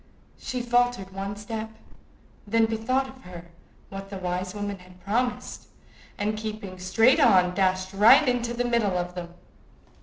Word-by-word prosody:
She 250 Hz, -1 st, -4 dB
faltered 245 Hz, -5 st, +1 dB
one 195 Hz, +1 st, -4 dB
step, 220 Hz, +2 st, -6 dB, 0.8 s
then 225 Hz, +2 st, +3 dB
bethought 255 Hz, +4 st, -2 dB
her 180 Hz, -1 st, -10 dB
of 170 Hz, -, -10 dB, 0.5 s
what 195 Hz, 0 st, -8 dB
the 195 Hz, -, -6 dB
wise 180 Hz, +1 st, -3 dB
woman 205 Hz, -1 st, -4 dB
had 180 Hz, 0 st, -17 dB
promised, 240 Hz, +6 st, -2 dB, 0.5 s
and 210 Hz, +1 st, -1 dB
keeping 215 Hz, -3 st, -6 dB
straight 225 Hz, -, +4 dB
on, 185 Hz, -9 st, +5 dB
dashed 185 Hz, 0 st, 0 dB
right 225 Hz, +8 st, +6 dB
into 240 Hz, -1 st, 0 dB
the 245 Hz, +1 st, -1 dB
middle 230 Hz, -6 st, +1 dB
of 175 Hz, 0 st, -3 dB
them. 175 Hz, -1 st, -8 dB
205 Hz, 150 wpm, -26 LUFS, 185-235 Hz, 0.8 s, right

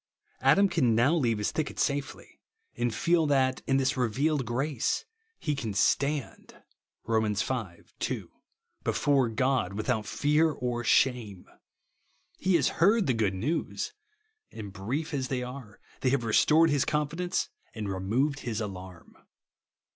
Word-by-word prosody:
Adam 200 Hz, 0 st, +5 dB
can 135 Hz, -, +2 dB
now 120 Hz, +7 st, +4 dB
leave 120 Hz, -9 st, +1 dB
his 105 Hz, -, -1 dB
thicket 155 Hz, -2 st, -3 dB
safely; 140 Hz, -1 st, -3 dB, 0.4 s
and 120 Hz, 0 st, 0 dB
feel 165 Hz, +8 st, +2 dB
that, 130 Hz, -2 st, +2 dB
in 135 Hz, -, +3 dB
this 135 Hz, +1 st, +1 dB
revealed 130 Hz, +3 st, 0 dB
gi 135 Hz, +6 st, -1 dB
ace, 125 Hz, -6 st, -1 dB, 0.3 s
he 150 Hz, -, -2 dB
can 115 Hz, -8 st, -4 dB
"stand" 140 Hz, +5 st, 0 dB, 0.4 s
(Rom. 110 Hz, -2 st, +1 dB
v. 105 Hz, -4 st, -2 dB, 0.2 s
2) -, -, -3 dB, 0.5 s
before 135 Hz, -4 st, +2 dB
God 125 Hz, -4 st, 0 dB
without 110 Hz, 0 st, -1 dB
fear 150 Hz, +2 st, +2 dB
or 125 Hz, -4 st, -3 dB
shame. 120 Hz, -9 st, +1 dB, 0.9 s
He 185 Hz, -1 st, +2 dB
has 145 Hz, -6 st, +3 dB
heard 205 Hz, +4 st, +5 dB
the 130 Hz, -, +2 dB
good 105 Hz, -4 st, 0 dB
news; 160 Hz, -, -2 dB, 0.6 s
and 100 Hz, -3 st, -8 dB
brief 135 Hz, +12 st, -3 dB
as 130 Hz, -2 st, -1 dB
they 125 Hz, -1 st, -2 dB
are, 125 Hz, -4 st, -9 dB, 0.2 s
they 130 Hz, -, +1 dB
have 130 Hz, -2 st, +1 dB
restored 155 Hz, +8 st, +4 dB
his 145 Hz, -2 st, +2 dB
confidence 155 Hz, +4 st, -1 dB, 0.3 s
and 110 Hz, -2 st, -4 dB
removed 115 Hz, +10 st, 0 dB
his 115 Hz, -4 st, -3 dB
alarm. 95 Hz, -5 st, -8 dB
130 Hz, 140 wpm, -28 LUFS, 110-150 Hz, 0.9 s, Adam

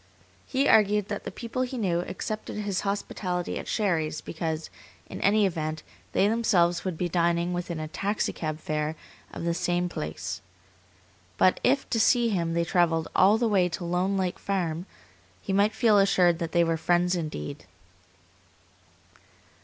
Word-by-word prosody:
He 275 Hz, +1 st, +1 dB
argued 210 Hz, -1 st, +4 dB
that 205 Hz, -, -4 dB
the -, -, -4 dB
people 235 Hz, +2 st, -4 dB
he 255 Hz, 0 st, -2 dB
knew 180 Hz, -7 st, 0 dB
accepted 215 Hz, +4 st, -5 dB
his 205 Hz, -3 st, -2 dB
hospitality 190 Hz, -3 st, -2 dB
at -, -, -8 dB
Sherry's 165 Hz, -8 st, 0 dB
because, 160 Hz, -1 st, -4 dB, 0.3 s
in -, -, -8 dB
any 205 Hz, +1 st, +4 dB
event, 155 Hz, -4 st, -2 dB, 0.3 s
they 195 Hz, -, +3 dB
themselves 190 Hz, -6 st, +2 dB
would 185 Hz, -4 st, -3 dB
be 180 Hz, -, -1 dB
dining 170 Hz, 0 st, +1 dB
within 175 Hz, -2 st, -3 dB
a 155 Hz, -, -4 dB
taxicab 165 Hz, -4 st, -2 dB
fare 155 Hz, 0 st, -2 dB, 0.4 s
of -, -, -7 dB
the 170 Hz, 0 st, +1 dB
same 175 Hz, 0 st, 0 dB
place. 100 Hz, -, -5 dB, 1.0 s
But 185 Hz, -, +4 dB
if 270 Hz, +2 st, +2 dB
to 230 Hz, -, +1 dB
see 240 Hz, +1 st, +4 dB
him 170 Hz, -5 st, -1 dB
they 170 Hz, 0 st, +1 dB
travelled 165 Hz, -2 st, +1 dB
all 200 Hz, +4 st, +6 dB
the 235 Hz, 0 st, +1 dB
way 190 Hz, -4 st, +3 dB
to 175 Hz, -, -5 dB
Lone 180 Hz, +3 st, 0 dB
Lake 185 Hz, -2 st, -1 dB
Farm, 180 Hz, -3 st, -2 dB, 0.5 s
he 195 Hz, -, -4 dB
might 205 Hz, +2 st, +3 dB
feel 220 Hz, -3 st, +4 dB
assured 180 Hz, -3 st, +4 dB
that 165 Hz, -2 st, -3 dB
they 170 Hz, -1 st, +4 dB
were 165 Hz, -1 st, 0 dB
friends 175 Hz, +2 st, +2 dB
indeed. 155 Hz, -, -5 dB
180 Hz, 160 wpm, -27 LUFS, 165-205 Hz, 1.0 s, all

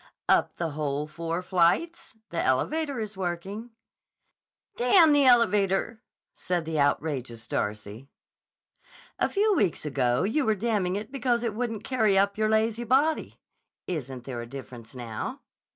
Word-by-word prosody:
"Up -, -, +2 dB
the 165 Hz, -2 st, -2 dB
whole 145 Hz, -1 st, -2 dB
four 165 Hz, +3 st, -4 dB
flights? 185 Hz, -, +1 dB, 0.2 s
The 170 Hz, -, -1 dB
elevator 280 Hz, -, 0 dB
is 215 Hz, -1 st, -5 dB
working." 190 Hz, +5 st, -4 dB, 1.1 s
"D——n 310 Hz, +7 st, +5 dB
the 285 Hz, -1 st, +4 dB
elevator!" 220 Hz, -2 st, +3 dB, 0.3 s
said 175 Hz, -2 st, -2 dB
the 160 Hz, -1 st, -2 dB
outrageous 135 Hz, -5 st, -1 dB
Darcy. 105 Hz, +5 st, -4 dB, 1.1 s
"A -, -, +2 dB
few 420 Hz, +1 st, +2 dB
weeks 195 Hz, -, +1 dB
ago 130 Hz, -3 st, +1 dB
you 230 Hz, +10 st, +1 dB
were 220 Hz, -4 st, +2 dB
damning 205 Hz, -4 st, 0 dB
it 210 Hz, +3 st, -5 dB
because 245 Hz, -3 st, 0 dB
it 230 Hz, -3 st, -1 dB
wouldn't 225 Hz, -1 st, -3 dB
carry 220 Hz, -6 st, +2 dB
up 200 Hz, +1 st, +3 dB
your 215 Hz, 0 st, +1 dB
lazy 220 Hz, +2 st, +1 dB
body. 275 Hz, +7 st, +1 dB, 0.5 s
Isn't 135 Hz, -7 st, -5 dB
there 125 Hz, -3 st, -5 dB
a 120 Hz, -, -8 dB
difference 120 Hz, -2 st, -10 dB
now?" 115 Hz, -3 st, -6 dB
190 Hz, 140 wpm, -27 LUFS, 145-235 Hz, 1.1 s, D——n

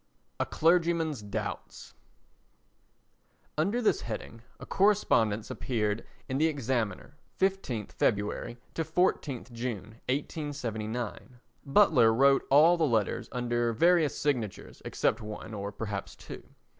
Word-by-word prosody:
A -, -, 0 dB
Clergyman's 165 Hz, -4 st, +2 dB
Doubts 100 Hz, -1 st, -6 dB, 1.6 s
Under 200 Hz, +11 st, 0 dB
this -, -, +2 dB
heading 115 Hz, +1 st, -6 dB, 0.2 s
a -, -, -8 dB
correspondence 115 Hz, -, +2 dB
appeared 110 Hz, -3 st, -2 dB, 0.2 s
in 130 Hz, +1 st, -2 dB
the 160 Hz, -, +4 dB
Examiner, 130 Hz, -, -2 dB, 0.2 s
15_th_ 190 Hz, -, -1 dB
February 105 Hz, +2 st, -1 dB, 0.2 s
to 165 Hz, -, -1 dB
14_th_ 160 Hz, -6 st, 0 dB
June, 115 Hz, -2 st, -5 dB
1879. 125 Hz, -5 st, -4 dB, 0.2 s
Butler 140 Hz, -, +5 dB
wrote 135 Hz, +4 st, +4 dB
all 160 Hz, +5 st, +6 dB
the 165 Hz, -, +1 dB
letters 110 Hz, -5 st, 0 dB
under 120 Hz, -1 st, 0 dB
various 170 Hz, +3 st, +3 dB
signatures 125 Hz, -9 st, -2 dB
except -, -, 0 dB
one 105 Hz, +1 st, -7 dB
or 100 Hz, -1 st, -4 dB
perhaps 100 Hz, -2 st, -5 dB
two. -, -, -10 dB
125 Hz, 110 wpm, -29 LUFS, 110-160 Hz, 1.6 s, all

